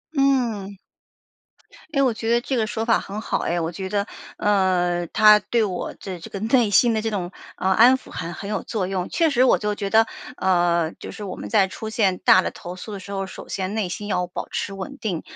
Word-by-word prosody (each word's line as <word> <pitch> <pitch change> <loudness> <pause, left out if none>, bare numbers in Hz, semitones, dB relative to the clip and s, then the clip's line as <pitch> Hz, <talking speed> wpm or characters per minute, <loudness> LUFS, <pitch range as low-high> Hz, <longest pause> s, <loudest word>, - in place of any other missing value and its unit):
嗯， 240 -8 +1 1.2
诶， 275 - +2
我 255 -3 +3
觉 225 +1 -3
得 235 - +3
这 260 +1 -2
个 220 - +1
说 220 0 -3
法 230 0 +3
很 205 +2 -6
好 - - -1
哎， 175 0 -1
我 165 0 -1
觉 190 +2 -5
得， 200 +1 -1 0.3
呃， 180 -4 +1
它 215 -1 +7
对 230 +2 0
我 185 -4 -3
的 185 -3 -7
这 165 - -10
个 195 - -6
内 225 +1 +3
心 230 +4 +5
的 220 - 0
这 225 +1 -2
种 185 -4 -3 0.3
安 225 +7 +5
抚 260 - -15
很 170 0 -5
很 200 - -7
有 210 - -2
作 200 -5 -2
用。 185 -2 -2
确 330 -2 +2
实 255 -2 +3
我 260 - +5
就 210 0 -2
觉 200 -1 -3
得， 225 +2 +4 0.3
呃， 175 -3 +2
就 - - -8
是 215 - -9
我 195 - -5
们 - - -7
在 195 -4 +3
出 220 +3 -7
现 200 -5 +1
大 185 - +5
的 - - -2
投 175 +1 -8
诉 205 +4 -8
的 200 - -5
时 200 +2 -9
候， 195 -1 -2
首 - - -10
先 190 +1 -3
内 215 -4 -1
心 205 +3 -5
要 180 -3 0
保 180 - -6
持 200 - -3
稳 195 +9 -7
定， 185 -8 -3
205 Hz, 250 characters per minute, -23 LUFS, 185-225 Hz, 1.2 s, 它